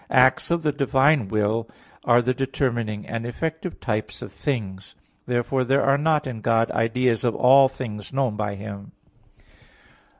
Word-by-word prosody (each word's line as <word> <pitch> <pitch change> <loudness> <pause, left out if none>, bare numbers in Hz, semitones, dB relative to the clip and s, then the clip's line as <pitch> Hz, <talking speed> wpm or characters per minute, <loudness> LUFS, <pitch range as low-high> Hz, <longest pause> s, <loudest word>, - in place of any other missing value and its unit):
v): - - -3
"Acts 130 +1 +4
of 170 -1 0
the 150 - +2
divine 140 -2 +2
will 110 +2 -1 0.3
are 120 0 +4
the 130 +2 +1
determining 120 -5 -2
and 115 0 -4
effective 160 +8 -5
types 105 -3 -4
of - - -9
things." 100 -9 -4 0.3
Therefore 125 +2 0
there 135 +2 +2
are 135 +1 +3
not 150 0 +1
in 120 -4 -6
God 115 +1 +1
ideas 115 0 0
of 120 -2 0
all 135 +2 +6
things 110 -6 -7
known 135 -5 0
by 105 -1 -3
Him. 100 0 -9
120 Hz, 160 wpm, -23 LUFS, 110-135 Hz, 0.3 s, all